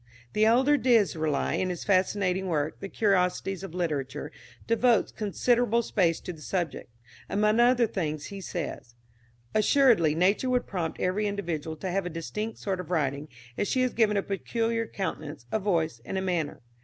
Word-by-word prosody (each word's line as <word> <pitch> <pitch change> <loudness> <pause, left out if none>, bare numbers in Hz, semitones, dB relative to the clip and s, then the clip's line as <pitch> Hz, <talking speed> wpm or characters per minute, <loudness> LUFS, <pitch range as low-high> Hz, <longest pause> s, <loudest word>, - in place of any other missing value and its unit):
The 215 +1 +3
elder 260 +6 +4
d'Israeli, 190 - +2
in 185 - 0
his 175 -2 -4
fascinating 190 -1 +1
work, 155 -3 -1
the 195 - -6
"Curiosities 190 -2 +1
of 190 -3 -8
Literature," 150 -8 -3 0.3
devotes 230 0 +3
considerable 235 +2 +1
space 175 -8 +1
to 180 - -6
the 155 - -14
subject. 170 -7 -3 0.4
Among 210 +2 +2
other 240 0 +5
things, 155 -8 -3
he 195 - -6
says: 150 -9 -5 0.6
"Assuredly 215 - +4
nature 195 +9 +2
would 250 -1 +1
prompt 170 -5 -3
every 200 +4 0
individual 165 -6 -3
to 185 +3 -4
have 195 0 -1
a - - -3
distinct 210 +7 -5
sort 190 -2 -3
of 180 - -7
writing, 145 -3 -1 0.3
as 205 - +1
she 255 -1 +1
has 255 - 0
given 215 -3 +3
a 200 - +1
peculiar 230 +3 -1
countenance, 155 - -5
a - - +1
voice, 165 - 0
and 190 - -4
a - - 0
manner. 175 -5 -2
190 Hz, 170 wpm, -28 LUFS, 165-220 Hz, 0.6 s, other